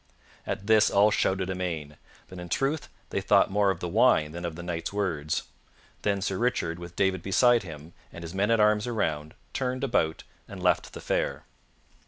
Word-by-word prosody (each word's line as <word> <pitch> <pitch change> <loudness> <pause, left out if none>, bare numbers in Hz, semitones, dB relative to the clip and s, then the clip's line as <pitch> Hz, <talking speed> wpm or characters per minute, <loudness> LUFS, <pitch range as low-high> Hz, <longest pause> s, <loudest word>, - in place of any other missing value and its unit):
At 100 - -3
this 110 0 +5
all 105 +2 +4
shouted 95 -2 0
amain; 85 -5 -4 0.3
but 95 - -10
in 90 0 -8
truth 140 - -1 0.2
they - - -1
thought - - +4
more 100 0 +3
of 95 -3 -2
the 90 - -2
wine 95 -6 +3
than 85 +2 -6
of 85 -2 -4
the 85 - -7
Knight's 85 -1 -4
words. 85 -7 -1 0.6
Then 100 -2 0
Sir 95 -2 -2
Richard, 105 -9 0
with 85 0 -9
David 95 -1 +1
beside 120 +6 +4
him 80 -2 -10 0.2
and 85 - -9
his 85 +1 -7
men 100 +2 +1
at 115 -1 +3
arms 105 +1 +3
around, 80 -10 -2 0.2
turned 130 0 -2
about 80 -12 0 0.2
and - - -9
left - - +1
the - - -8
fair. - - -1
95 Hz, 190 wpm, -27 LUFS, 85-105 Hz, 0.6 s, this